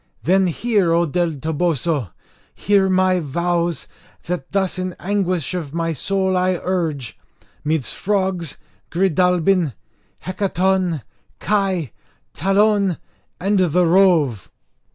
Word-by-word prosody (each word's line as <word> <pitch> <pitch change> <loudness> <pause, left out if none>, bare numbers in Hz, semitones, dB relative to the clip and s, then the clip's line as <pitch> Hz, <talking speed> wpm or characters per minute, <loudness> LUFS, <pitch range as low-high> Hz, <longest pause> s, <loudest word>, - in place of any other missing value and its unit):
Then 190 +2 +3
hear, 195 -1 +1
O 170 +1 +3
del 170 +1 0
Toboso! 155 - -1 0.5
hear 200 -2 +2
my 185 0 +3
vows, 170 +1 -1 0.4
that 175 -6 -4
thus 190 -2 0
in 185 -1 -3
anguish 185 -5 -1
of 165 -4 -5
my 165 -1 -1
soul 190 +5 0
I 185 -1 +1
urge, 160 -10 -2 0.4
midst 155 -3 -1
frogs, 190 -5 -1 0.3
Gridalbin, 180 -2 +2 0.5
Hecaton, 185 - 0 0.4
Kai, 190 - 0 0.4
Talon, 195 +1 +2 0.4
and 200 +2 +1
the 180 0 +3
Rove! 165 - +3
180 Hz, 105 wpm, -20 LUFS, 165-190 Hz, 0.5 s, Then